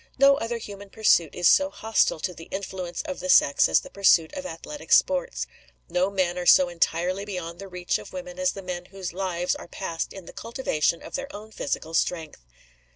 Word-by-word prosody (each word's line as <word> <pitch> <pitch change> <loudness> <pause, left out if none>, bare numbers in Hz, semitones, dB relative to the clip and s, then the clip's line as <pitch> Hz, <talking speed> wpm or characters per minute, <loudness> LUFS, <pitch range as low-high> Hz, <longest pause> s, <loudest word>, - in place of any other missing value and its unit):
No 275 +1 +6
other 235 -2 -2
human 200 -2 -9
pursuit 190 -7 +3
is 175 -1 +3
so 285 +8 +5
hostile 220 - +1
to 180 - -2
the 165 -1 -11
influence 190 -2 -5
of 285 -3 -5
the 275 - -5
sex 140 - +5
as - - +4
the - - -12
pursuit 175 -5 +4
of 280 -1 -5
athletic 290 - -9
sports. - - +3 0.4
No 180 +2 +1
men 185 -3 0
are 175 - -4
so 185 -1 +7
entirely 175 +3 0
beyond 180 -4 -6
the 195 - -7
reach 180 -1 -2
of - - -11
women 270 0 -7
as 275 0 +1
the 195 - -8
men 180 -1 -5
whose 190 -2 -7
lives 180 -1 -1
are - - -8
passed 170 -2 -4
in 190 -3 -10
the - - -11
cultivation 225 - -1
of - - -10
their 275 0 -3
own 215 +1 -10
physical 160 -3 -4
strength. 165 - -1
190 Hz, 205 wpm, -25 LUFS, 175-225 Hz, 0.4 s, so